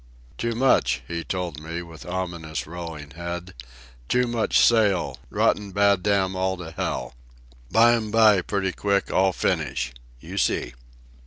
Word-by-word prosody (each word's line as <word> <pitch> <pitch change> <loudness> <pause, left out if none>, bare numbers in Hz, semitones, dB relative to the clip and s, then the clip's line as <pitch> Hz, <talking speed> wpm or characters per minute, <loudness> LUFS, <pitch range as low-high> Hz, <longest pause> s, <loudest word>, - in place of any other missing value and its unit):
"Too 115 0 -2
much," 115 - +2
he 85 -1 -4
told 90 -5 -4
me, 85 +2 -5
with 85 -1 -12
ominous 85 -5 -4
rolling 80 -3 -7
head. 85 +3 -6 0.6
"Too 125 0 +3
much 120 -2 +1
sail, 105 -6 +3
rotten 100 -2 +1
bad 100 -1 +3
damn 95 -1 +1
all 95 0 0
to 85 -2 -8
hell. 80 - -3 0.6
Bime 115 -1 +4
by, 105 -3 +5
pretty 95 0 -1
quick, 100 +1 0
all 95 0 +3
finish. 80 - -1 0.3
You - - -5
see." - - 0
95 Hz, 140 wpm, -24 LUFS, 85-105 Hz, 0.6 s, by